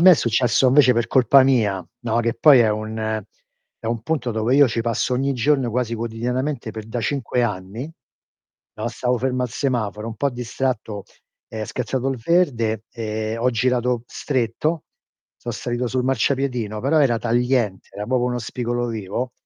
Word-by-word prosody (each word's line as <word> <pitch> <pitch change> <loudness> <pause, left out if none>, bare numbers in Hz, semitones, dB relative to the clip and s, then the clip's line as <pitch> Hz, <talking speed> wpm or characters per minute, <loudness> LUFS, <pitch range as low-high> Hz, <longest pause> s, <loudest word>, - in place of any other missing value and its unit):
me 185 +2 +9
è - - +8
successo 120 0 +2
invece 130 -1 +6
per 115 -1 0
colpa 130 +2 +5
mia, 110 -8 +2 0.2
no, 115 0 0
che 115 0 0
poi 140 -4 +7
è 110 -2 +4
un 110 0 -3 0.6
è - - -5
un 115 0 -1
punto 130 -2 -1
dove 110 +3 0
io 140 -1 +6
ci 115 0 -1
passo 115 +2 -1
ogni 135 +2 +1
giorno 135 0 +1
quasi 115 0 -1
quotidianamente 120 +3 -3
per 110 0 -8
da 115 +2 -3
5 125 0 -1
anni, 105 +5 -4 0.8
no, 110 +2 -3
stavo 125 +1 -1
fermo 130 0 -1
al 125 - -1
semaforo, 110 -5 -2
un 115 - -5
po' 140 +5 0
distratto, 120 -4 -3 0.5
è 110 -1 -5
scattato 125 +3 -2
il 135 - -1
verde 115 - +1
e 110 0 -3
ho 125 +2 +2
girato 125 0 +1
stretto, 140 +6 -2 0.5
so' 120 - -6
salito 120 +2 -3
sul 125 +1 -1
marciapiedino, 130 -5 0
però 150 +6 +2
era 120 -5 +3
tagliente, 120 -3 0
era 105 +1 -5
proprio 125 -1 +1
uno 125 0 -1
spigolo 120 +1 -2
vivo, 115 +2 -4
120 Hz, 170 wpm, -22 LUFS, 110-130 Hz, 0.8 s, me